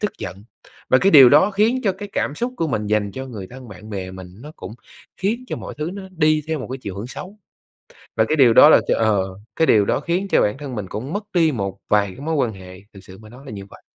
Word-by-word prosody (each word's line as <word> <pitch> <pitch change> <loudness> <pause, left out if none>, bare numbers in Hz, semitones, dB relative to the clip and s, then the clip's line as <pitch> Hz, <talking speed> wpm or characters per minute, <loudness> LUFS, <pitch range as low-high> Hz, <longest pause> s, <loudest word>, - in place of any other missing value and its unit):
tức 210 - -2
giận. 95 +3 -8 0.5
Và 130 - +6
cái 195 - +3
điều 135 -4 +10
đó 150 +9 +5
khiến 220 +6 +1
cho 195 - +2
cái 205 - -7
cảm 145 - -2
xúc 245 +7 -3
của 165 - -1
mình 105 -5 -2
dành 105 -1 0
cho 130 0 -6
người 105 -7 -8
thân, 125 -1 -11
bạn 105 +2 -12
bè 95 -3 -5
mình 95 -1 -10
nó 150 - -10
cũng - - -9 0.4
khiến 220 +6 -2
cho - - -3
mọi - - -8
thứ 155 +2 -3
nó 200 - -7
đi 155 -3 +1
theo 160 - -1
một - - -7
cái 135 - -5
chiều 95 -2 -6
hưởng 105 +4 -5
xấu. 190 +10 -9 0.8
Và 110 - +3
cái 155 - +1
điều 130 -5 +6
đó - - +9
là - - +7
ch - - +2
ờ, 110 -4 +2 0.3
cái 160 - +2
điều 105 -2 +4
đó - - 0
khiến 175 +6 -2
cho - - +4
bản 105 +5 -1
thân 140 -3 -7
mình 105 -4 -5
cũng 125 - -6
mất 205 +1 -3
đi 165 -3 +3
một 100 -5 -4
vài 105 -1 +2
cái 120 - -12
mối 160 +3 -2
quan 125 -6 0
hệ, 95 -1 -12
thực 95 - -12
sự 95 0 -13
mà 110 -1 -14
nói 125 +4 -14
là 130 - -8
như 100 -2 -8
vậy. - - -15
130 Hz, 280 wpm, -21 LUFS, 105-160 Hz, 0.8 s, điều